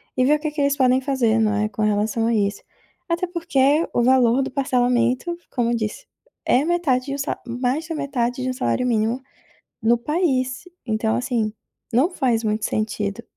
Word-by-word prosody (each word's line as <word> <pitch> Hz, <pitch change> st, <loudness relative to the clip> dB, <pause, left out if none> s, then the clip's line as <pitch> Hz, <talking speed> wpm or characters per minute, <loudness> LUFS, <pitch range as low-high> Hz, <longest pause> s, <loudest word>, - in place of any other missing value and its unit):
e 255 Hz, -, +2 dB
ver 295 Hz, +3 st, +5 dB
o -, -, -17 dB
que 305 Hz, 0 st, -3 dB
que 300 Hz, -1 st, -3 dB
eles 280 Hz, 0 st, +2 dB
podem 260 Hz, -1 st, +3 dB
fazer, 255 Hz, -5 st, +1 dB
não 215 Hz, -1 st, +2 dB
é, 210 Hz, +1 st, +1 dB
com 215 Hz, -, -5 dB
relação 215 Hz, +2 st, +1 dB
a 235 Hz, -, +1 dB
isso. 205 Hz, -2 st, 0 dB, 0.5 s
Até 340 Hz, +2 st, 0 dB
porque, 325 Hz, -3 st, +2 dB
o 240 Hz, -, +2 dB
valor 250 Hz, 0 st, +4 dB
do -, -, -5 dB
parcelamento, 250 Hz, +3 st, +1 dB
como 240 Hz, -2 st, 0 dB
eu -, -, +1 dB
disse, 225 Hz, -, -4 dB, 0.4 s
é 255 Hz, -, +3 dB
metade 310 Hz, -7 st, +1 dB
de 275 Hz, -, -3 dB
1 -, -, -5 dB
sa 280 Hz, -, -2 dB
mais 250 Hz, +6 st, -2 dB
da 330 Hz, -, -4 dB
metade 260 Hz, -4 st, -2 dB
de 255 Hz, -, -1 dB
1 -, -, -1 dB
salário 255 Hz, -1 st, -1 dB
mínimo 230 Hz, +2 st, 0 dB, 0.6 s
no 230 Hz, +2 st, +4 dB
país, 260 Hz, -1 st, -1 dB, 0.2 s
então 220 Hz, 0 st, 0 dB
assim, 235 Hz, -4 st, -1 dB, 0.4 s
não 270 Hz, +10 st, +3 dB
faz 250 Hz, -9 st, 0 dB
muito 215 Hz, 0 st, -1 dB
sentido. 210 Hz, 0 st, -2 dB
250 Hz, 195 wpm, -22 LUFS, 225-280 Hz, 0.6 s, ver